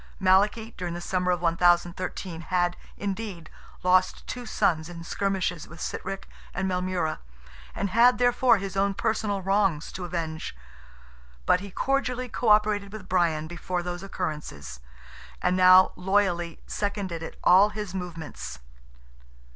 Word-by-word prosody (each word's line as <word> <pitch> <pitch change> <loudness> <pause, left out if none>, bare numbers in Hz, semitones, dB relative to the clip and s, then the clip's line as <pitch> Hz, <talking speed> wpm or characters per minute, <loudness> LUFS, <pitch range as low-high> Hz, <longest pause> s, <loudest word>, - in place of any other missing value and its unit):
Malachy, 205 +4 +3
during 175 -1 -4
the - - -4
summer 180 +1 -1
of 175 -1 0
1013, 175 0 +1
had, 175 +1 0 0.2
indeed, 195 -5 -5 0.3
lost 185 0 +3
two 245 -2 -6
sons 160 -5 +1
in 170 -1 -8
skirmishes 185 -2 -2
with 170 - -12
Sitrick 195 +4 -5 0.3
and 190 +1 -1
Maelmurra, 180 -3 -1 0.6
and 200 -1 -2
had, 240 +3 +5
therefore, 245 -1 +4
his 195 0 -5
own 195 0 +1
personal 210 -3 -1
wrongs 195 -5 +1
to 185 - -6
avenge; 165 - -4 0.9
but 180 - +4
he 200 +2 -8
cordially 255 +3 -1
co 230 0 -1
operated 210 -1 +3
with 215 -3 -9
Brian 170 -4 +1
before 175 +2 -4
those 175 0 -4
occurrences, 150 - -5 0.6
and 180 - +1
now 185 0 +7
loyally 180 -3 0
seconded 195 -5 -4
all 190 +4 +7
his 210 -3 -6
movements. 170 - -6
185 Hz, 130 wpm, -26 LUFS, 175-200 Hz, 0.9 s, now